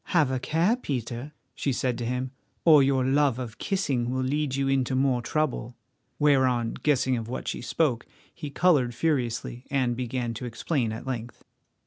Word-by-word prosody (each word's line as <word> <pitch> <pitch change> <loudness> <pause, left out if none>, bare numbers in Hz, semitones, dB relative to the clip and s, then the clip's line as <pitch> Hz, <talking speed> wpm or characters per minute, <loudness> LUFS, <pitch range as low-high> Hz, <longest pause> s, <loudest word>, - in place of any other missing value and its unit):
"Have 155 -7 +2
a 130 - 0
care, 165 - +2
Peter," 125 - -4 0.2
she 140 - -1
said 125 -1 0
to 120 - -2
him, 125 +1 -2 0.3
"or 155 -4 +8
your 135 -1 +2
love 135 -1 +3
of 120 -4 -6
kissing 140 - 0
will 130 +1 -1
lead 140 +1 0
you 135 0 0
into 135 -1 +1
more 130 -2 +2
trouble." 125 -3 -1 0.4
Whereon, 130 -5 +3
guessing 130 -3 +2
of 115 -1 -5
what 130 - -5
she - - -3
spoke, 125 -2 0 0.3
he 150 -4 -6
coloured 140 -6 +3
furiously, 125 -5 -1
and 130 -3 +1
began 125 -1 -2
to 115 +3 -6
explain 120 0 -1
at 110 +3 -6
length. 120 -3 -5
130 Hz, 170 wpm, -27 LUFS, 120-145 Hz, 0.4 s, or